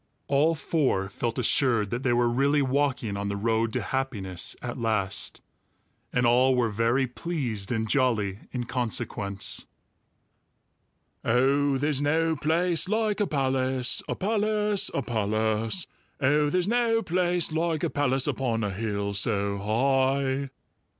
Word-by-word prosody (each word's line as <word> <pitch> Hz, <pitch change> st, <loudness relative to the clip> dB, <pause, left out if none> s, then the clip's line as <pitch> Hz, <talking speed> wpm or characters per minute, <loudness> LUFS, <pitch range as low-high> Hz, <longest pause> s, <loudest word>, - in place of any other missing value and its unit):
All 150 Hz, +4 st, +3 dB
four 135 Hz, -, 0 dB
felt 115 Hz, +3 st, -3 dB
assured 120 Hz, -4 st, +2 dB
that 120 Hz, -, -2 dB
they 130 Hz, -3 st, +1 dB
were 120 Hz, 0 st, +2 dB
really 140 Hz, +4 st, +2 dB
walking 130 Hz, -5 st, 0 dB
on 100 Hz, 0 st, -3 dB
the 100 Hz, 0 st, -2 dB
road 110 Hz, +1 st, 0 dB
to -, -, -1 dB
happiness 105 Hz, -10 st, -2 dB
at 125 Hz, +1 st, -6 dB
last, 105 Hz, -4 st, -2 dB, 0.7 s
and 125 Hz, 0 st, +1 dB
all 125 Hz, +2 st, +4 dB
were 120 Hz, -3 st, +1 dB
very 115 Hz, +5 st, +1 dB
pleased 125 Hz, -, -4 dB
and 110 Hz, -2 st, -1 dB
jolly 110 Hz, -7 st, +1 dB
in 125 Hz, -1 st, -3 dB
consequence. 110 Hz, -5 st, -2 dB, 1.6 s
"Oh, 135 Hz, +4 st, +2 dB
there's 145 Hz, 0 st, 0 dB
no 160 Hz, +2 st, +1 dB
place 165 Hz, +3 st, +1 dB
like 215 Hz, -1 st, 0 dB
a 205 Hz, -, +1 dB
palace, 130 Hz, -3 st, +1 dB
A -, -, -1 dB
palace, 210 Hz, 0 st, +1 dB
a 140 Hz, -, -2 dB
palace! 110 Hz, -, 0 dB, 0.3 s
Oh, 150 Hz, +2 st, +2 dB
there's 180 Hz, +3 st, 0 dB
no 230 Hz, 0 st, +2 dB
place 175 Hz, -1 st, +1 dB
like 160 Hz, -1 st, -1 dB
a -, -, +1 dB
palace 135 Hz, -2 st, +1 dB
Upon 115 Hz, -4 st, -1 dB
a 105 Hz, -, -1 dB
hill 100 Hz, 0 st, -3 dB
so 100 Hz, 0 st, -1 dB
high!" 135 Hz, +5 st, +1 dB
130 Hz, 135 wpm, -26 LUFS, 110-150 Hz, 1.6 s, all